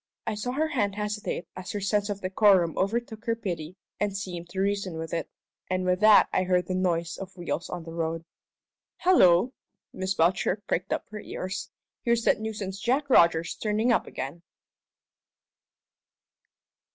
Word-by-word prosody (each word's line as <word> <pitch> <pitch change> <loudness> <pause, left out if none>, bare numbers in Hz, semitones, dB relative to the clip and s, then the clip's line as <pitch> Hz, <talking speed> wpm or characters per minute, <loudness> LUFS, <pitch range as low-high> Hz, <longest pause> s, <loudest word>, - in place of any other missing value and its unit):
I - - -1
saw 215 +4 -3
her 310 +3 0
hand 205 -9 0
hesitate 210 -3 -3
as 185 0 -6
her 205 - -2
sense 205 +1 0
of 200 -1 -3
decorum 185 -3 +4
overtook 225 +2 -2
her 230 -2 +1
pity 175 -6 -5 0.2
and 205 -1 0
seemed 175 -3 -6
to 190 - -5
reason 195 -3 -1
with 160 0 -5
it. 165 - -2 0.4
And 185 0 0
with 180 0 +2
that 215 0 +7
I - - +3
heard 180 -1 +2
the 185 - -3
noise 170 -2 0
of 190 -1 -9
wheels 175 -1 -3
on 175 -2 -5
the 165 0 -9
road. 165 0 -2 0.7
"Hallo!" 245 - +5 0.4
Miss 190 +1 -2
Belcher 180 +4 +2
pricked 185 +1 -2
up - - -2
her 215 - -6
ears. 185 -2 -5 0.3
"Here's 235 -1 +1
that - - +3
nuisance 210 -3 -4
Jack 270 +6 0
Rogers 165 -5 +5
turning 215 +3 0
up 235 - +2
again!" 140 +6 -6
195 Hz, 165 wpm, -27 LUFS, 175-215 Hz, 0.7 s, that